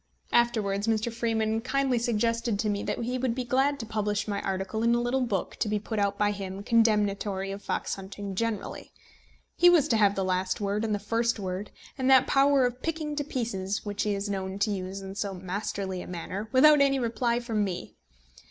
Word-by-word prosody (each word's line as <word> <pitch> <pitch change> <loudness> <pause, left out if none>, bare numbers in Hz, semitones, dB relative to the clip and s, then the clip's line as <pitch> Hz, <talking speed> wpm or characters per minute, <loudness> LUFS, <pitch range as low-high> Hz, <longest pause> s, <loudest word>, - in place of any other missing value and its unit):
Afterwards 215 -4 +2
Mr. 225 +1 0
Freeman 225 -1 0
kindly 260 0 +1
suggested 230 -1 0
to 215 0 0
me 205 -1 -1
that - - -2
he 250 +2 -2
would 250 -2 0
be 255 - -2
glad 270 +3 +1
to 225 - -5
publish 210 -2 -1
my 200 -1 -2
article 195 +3 -2
in 235 +1 +3
a - - +2
little 240 +2 0
book 205 -7 -2
to 220 - -1
be 210 - +1
put 215 +1 -4
out 200 0 +1
by 205 0 +2
him 195 -1 -6
condemnatory 205 -3 +1
of 200 +1 -6
fox - - -2
hunting 195 +1 -6
generally. 225 +1 -3 0.7
He 350 - +7
was 330 -5 +5
to 225 - +3
have 205 -2 +4
the 195 - -1
last 185 0 0
word 205 +1 -1
and 215 -2 0
the - - -1
first 230 +3 0
word, 190 +1 -4 0.3
and 260 0 +1
that 260 -1 +7
power 275 -1 +4
of 245 +1 -3
picking 310 -2 -3
to 290 - -1
pieces 220 -9 -3
which 205 0 -3
he 210 -1 0
is 200 +1 -3
known 190 -1 -3
to 210 +1 +2
use 190 0 -4
in 195 0 -7
so 200 -1 -3
masterly 190 0 -4
a - - -9
manner, 185 +4 -5
without 295 +3 +7
any 275 -1 +4
reply 235 -1 0
from 225 -3 -1
me! 185 -3 -4
215 Hz, 210 wpm, -28 LUFS, 200-240 Hz, 0.7 s, He